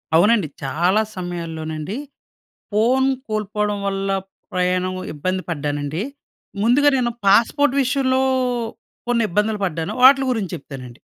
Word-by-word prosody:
అవునండి. 205 +1 +4 0.2
చాలా 175 +9 +2
సమయాల్లోనండి 165 0 -5 0.8
ఫోన్ 250 +5 +3 0.2
కోల్పోవడం 210 -1 -1
వల్ల 195 0 -2 0.4
ప్రయాణం 185 0 0 0.2
ఇబ్బంది 185 +5 -2
పడ్డానండి. 145 +2 -2 0.6
ముందుగా 280 +6 +5
నేను 240 -2 +1
పాస్‌పోర్ట్ 240 +8 +4
విషయంలో 260 0 +1 0.9
కొన్ని 240 -1 +2
ఇబ్బందులు 210 +3 0
పడ్డాను. 170 +2 -3
వాటిలి 270 +1 +7
గురించి 210 -7 -2
చెప్తానండి. 130 -3 -10
195 Hz, 100 wpm, -21 LUFS, 165-235 Hz, 0.9 s, వాటిలి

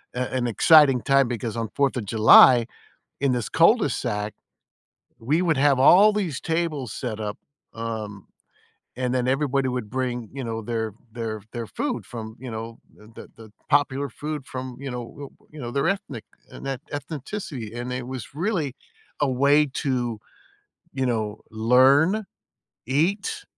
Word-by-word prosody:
a 125 - -2
an 125 -1 0
exciting 135 +2 +6
time 135 -2 +3
because 115 -1 -4
on 115 -2 -3
4th 140 -2 +1
of 115 - -3
July, 115 +3 +7 0.6
in 140 -2 +2
this 120 -4 -2
cul - - +5
de - - -1
sac, 105 0 -3 0.8
we 145 +9 0
would 165 -4 +2
have 140 -1 +4
all 190 +10 +7
these 180 -10 -2
tables 160 -8 -2
set 110 -5 -5
up, 105 -1 -4 0.4
um, 110 -4 -6 0.7
and 125 0 -1
then 125 -1 0
everybody 135 0 +1
would 125 -4 -3
bring, 125 -3 -3
you 135 0 -6
know, 115 -1 -3
their 110 -1 -3 0.2
their 110 -2 -4
their 120 -1 -5
food 280 -4 -3
from, 110 -2 -8
you 130 -1 -7
know, 115 +1 -7 0.2
the 105 - -17
the - - -11
the 110 -2 -14 0.2
popular 140 -1 +2
food 150 +3 -6
from, 130 -1 -6
you 140 -1 -5
know, 125 +3 -7
uh, - - -26
you 155 - -10
know, 120 -2 -5
their 140 +3 0
ethnic 145 - -3 0.3
etn 135 -1 -5
ethnicity, 145 - -6
and 120 +1 -4
it 125 -1 -4
was 130 0 -7
really 165 - -1 0.5
a 145 -2 +2
way 140 +4 +4
to, 125 -6 -1 0.8
you 135 -1 -1
know, 110 -3 -2
learn, 135 - +4 0.6
eat, 200 - 0
130 Hz, 160 wpm, -24 LUFS, 115-145 Hz, 0.8 s, July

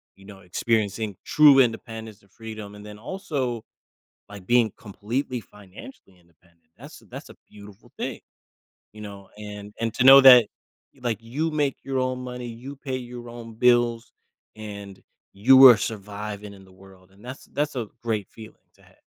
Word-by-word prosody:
you 95 - -19
know, 100 -2 -13
experiencing 105 +2 -2
true 145 -3 +6
independence 115 -3 -2
and 100 -1 -28
freedom, 110 -3 -9
and 105 0 -12
then 105 0 -10
also, 130 - -4 0.7
like, 100 -2 -12
being 120 -3 +3
completely 120 +5 -4
financially 100 - -15
independent, 85 -1 -31
that's - - -13
that's - - -9
a - - -14
beautiful 100 -1 -16
thing, - - -5 0.7
you 105 - -13
know, 100 -2 -10
and 105 -1 -9
and 115 -1 -2
to 130 - 0
know 135 +1 +10
that, 125 -4 +9 0.5
like, 120 -4 -2
you 145 +8 -3
make 145 -3 -1
your 135 -1 -3
own 130 0 -1
money, 125 -1 -7
you 125 +5 -9
pay 130 -2 -5
your 120 -1 -9
own 115 -1 -10
bills, 120 0 +2 0.4
and 100 -2 -9 0.3
you 130 +7 +7
are 120 - +8
surviving 105 -1 -6
in 95 -1 -15
the 95 - -20
world, 95 0 -19
and 100 +4 -21
that's 130 +2 -10
that's 150 0 -1
a 115 -3 -3 0.2
great 110 -4 -2
feeling 110 -1 -13 0.2
to - - -26
have. - - -24
110 Hz, 165 wpm, -24 LUFS, 100-125 Hz, 0.7 s, know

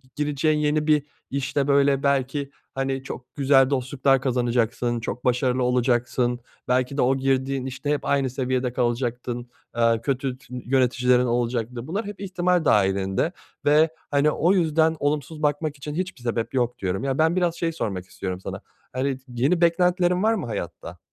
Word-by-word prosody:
gireceğin 150 +1 +1
yeni 150 0 +1
bir 150 -2 +4 0.3
işte 140 +1 -1
böyle 140 -1 +3
belki, 140 0 0 0.3
hani, 135 0 -2
çok 125 -2 -9
güzel 135 -2 +4
dostluklar 135 0 +1
kazanacaksın, 120 -1 0
çok 120 +1 -5
başarılı 125 +1 +2
olacaksın, 125 0 +1 0.3
belki 125 +2 +1
de - - +2
o 130 +2 +3
girdiğin 135 0 0
işte 135 +2 -5
hep 150 - -1
aynı 140 -2 +1
seviyede 130 -1 -1
kalacaktın, 120 0 -2 0.3
eee, 115 -1 +3
kötü 135 -1 -1
tü 125 -1 -16
yöneticilerin 125 -1 +3
olacaktı. 120 0 -1
Bunlar 200 +7 -2
hep 205 0 -7
ihtimal 180 -3 0
dahilinde 95 - +2 0.3
ve, 150 +2 +5 0.2
hani, 145 +1 +3
o 175 +5 +2
yüzden 160 -3 +2
olumsuz 150 +2 -2
bakmak 150 +1 0
için 145 +2 -6
hiçbir 180 -6 -4
sebep 115 -1 -2
yok 125 -2 0
diyorum. 95 +2 -2
Ya 135 -1 -1
ben 160 +2 +3
biraz 175 -2 +1
şey 170 -1 -1
sormak 100 - -4
istiyorum 95 0 -5
sana, - - -6 0.3
hani, 130 +1 -1
yeni 130 +8 +1
beklentilerin 180 +1 +3
var 220 +1 +4
mı 215 - -2
hayatta? 105 -7 -6
135 Hz, 160 wpm, -24 LUFS, 125-150 Hz, 0.3 s, ve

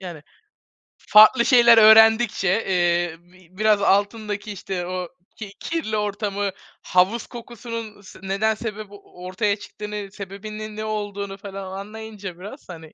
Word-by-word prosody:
Yani, 175 -5 -9 0.8
farklı 215 +3 +6
şeyler 235 -2 +6
öğrendikçe, 220 -1 +6 0.2
eee, 175 -2 +1
bi 180 +1 -23
biraz 215 -1 +3
altındaki, 205 +1 0
işte, 190 -2 -5
o 180 -1 -4 0.3
ki 200 -3 -8
kirli 315 -11 -3
ortamı 205 -1 -2 0.3
havuz 190 +6 +1
kokusunun 230 -3 -8
s 195 - -15
neden 200 +3 0
sebep 215 -1 -6
o 200 -3 -15
ortaya 200 +3 0
çıktığını, 210 -1 -8
sebebinin 210 +2 -8
ne 215 - -4
olduğunu 205 -2 -5
falan 195 -1 -8
anlayınca 210 -3 -9
biraz, 205 +8 -11
hani 160 -2 -11
205 Hz, 130 wpm, -22 LUFS, 190-215 Hz, 0.8 s, farklı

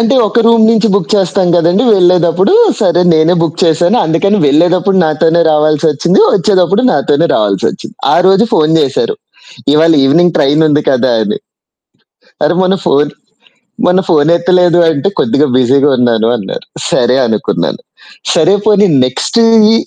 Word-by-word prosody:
అంటే 230 +4 +1
ఒక 235 +3 -1
రూమ్ 230 -1 +3
నుంచి 225 0 +1
బుక్ 200 -5 -2
చేస్తాం 190 -1 0
కదండీ 175 +7 +1
వెళ్ళేటప్పుడు 180 - +1 0.3
సరే 175 -4 +1
నేనే 160 +3 +2
బుక్ 165 -1 -4
చేశాను. 170 +2 +1
అందుకని 200 +6 0
వెళ్ళేటప్పుడు 175 +6 +1
నాతోనే 160 +2 0
రావాల్సొచ్చింది. 155 +3 0
వచ్చేటప్పుడు 195 +2 0
నాతోనే 150 +2 0
రావాల్సొచ్చింది. 100 -3 -3 0.2
ఆరోజు 190 +5 +2
ఫోను 155 +1 +1
చేశారు. 445 - -2 0.6
"ఇవాళ 165 +2 +3
ఇవినింగ్ 170 +4 +1
ట్రైన్ 145 +3 +1
ఉంది 150 0 0
కదా!" 130 -1 0
అని. 105 - -4 1.1
అరె! 155 +4 0
మొన్న 185 +1 +1
ఫోను 145 -2 0 0.7
మొన్న 180 +1 +1
ఫోనెత్తలేదు 170 +2 +1
అంటే 155 +3 -1
"కొద్దిగా 150 -8 0
బిజీగా 135 +3 +1
ఉన్నాను." 115 -3 0
అన్నారు 100 -5 -8 0.2
సరే 125 +2 0
అనుకున్నాను. 110 -2 -3 0.5
సరే 180 +5 +2
పోనీ 210 -1 +2 0.2
నెక్స్ట్ 130 - -3 0.3
ఈ - - +2
170 Hz, 135 wpm, -10 LUFS, 150-190 Hz, 1.1 s, రూమ్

